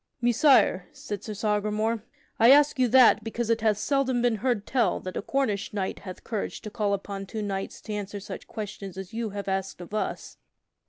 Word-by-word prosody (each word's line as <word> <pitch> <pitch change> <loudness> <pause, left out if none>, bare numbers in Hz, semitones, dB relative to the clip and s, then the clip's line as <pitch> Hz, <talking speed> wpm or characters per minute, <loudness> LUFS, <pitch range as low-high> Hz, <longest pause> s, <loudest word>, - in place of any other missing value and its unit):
"Messire," 240 -6 +4
said 205 -1 -6
Sir 215 - -6
Sagramore, 215 +1 0 0.4
"I 230 +1 +7
ask 290 0 +6
you 255 - +4
that 240 -3 +6
because 230 +1 -2
it 225 -1 +1
hath 215 -2 +2
seldom 260 0 +1
been 240 -2 +2
heard 235 -2 0
tell 255 -3 +1
that 185 - -6
a - - -2
Cornish 215 -5 -1
knight 190 -2 -2
hath 185 -2 -9
courage 215 -3 -4
to 215 - -8
call 205 -1 0
upon 195 0 -6
two 215 +3 -4
knights 195 -1 -4
to 215 - -6
answer 205 0 -4
such 195 - -8
questions 200 -3 -7
as 190 0 -7
you 225 -1 -2
have 200 0 -6
asked 195 -1 -2
of 175 +3 -10
us." 215 - -3
215 Hz, 200 wpm, -27 LUFS, 200-235 Hz, 0.4 s, I